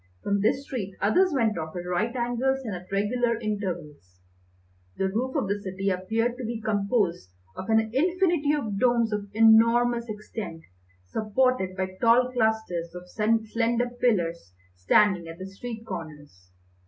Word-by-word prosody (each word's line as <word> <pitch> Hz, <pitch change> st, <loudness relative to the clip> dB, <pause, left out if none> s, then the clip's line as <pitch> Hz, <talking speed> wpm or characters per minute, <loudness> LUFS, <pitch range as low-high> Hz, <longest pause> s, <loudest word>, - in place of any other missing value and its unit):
From 200 Hz, 0 st, 0 dB
this 265 Hz, +6 st, +1 dB
street 200 Hz, -9 st, -5 dB
others 360 Hz, -, +3 dB
went 225 Hz, -, +1 dB
off 160 Hz, +1 st, -6 dB
at 175 Hz, 0 st, -5 dB
right 210 Hz, +7 st, -1 dB
angles 250 Hz, +2 st, 0 dB
and 215 Hz, -, -3 dB
at 180 Hz, +1 st, -10 dB
regular 230 Hz, +4 st, +1 dB
intervals. 175 Hz, -, -5 dB, 0.8 s
The 190 Hz, -, 0 dB
roof 250 Hz, +7 st, -2 dB
of 270 Hz, -9 st, 0 dB
the 200 Hz, +1 st, -2 dB
city 195 Hz, 0 st, -2 dB
appeared 225 Hz, +6 st, -1 dB
to 255 Hz, -, -6 dB
be 230 Hz, 0 st, -3 dB
composed 200 Hz, -, 0 dB, 0.3 s
of 190 Hz, -, -7 dB
an 220 Hz, 0 st, +5 dB
infinity 340 Hz, 0 st, +2 dB
of 220 Hz, -9 st, -2 dB
domes 235 Hz, -3 st, +2 dB
of 205 Hz, -1 st, -3 dB
enormous 230 Hz, +1 st, +5 dB
extent, 210 Hz, -5 st, -7 dB, 0.4 s
supported 215 Hz, -, 0 dB
by 185 Hz, 0 st, -3 dB
tall 245 Hz, +2 st, +4 dB
clusters 220 Hz, -8 st, -1 dB
of 180 Hz, 0 st, -9 dB
slender 230 Hz, +2 st, 0 dB
pillars 170 Hz, -, -1 dB, 0.2 s
standing 175 Hz, -, +3 dB
at 165 Hz, 0 st, -8 dB
the 190 Hz, -, -7 dB
street 225 Hz, +4 st, -8 dB
corners. 150 Hz, -, -9 dB
215 Hz, 150 wpm, -26 LUFS, 185-240 Hz, 0.8 s, an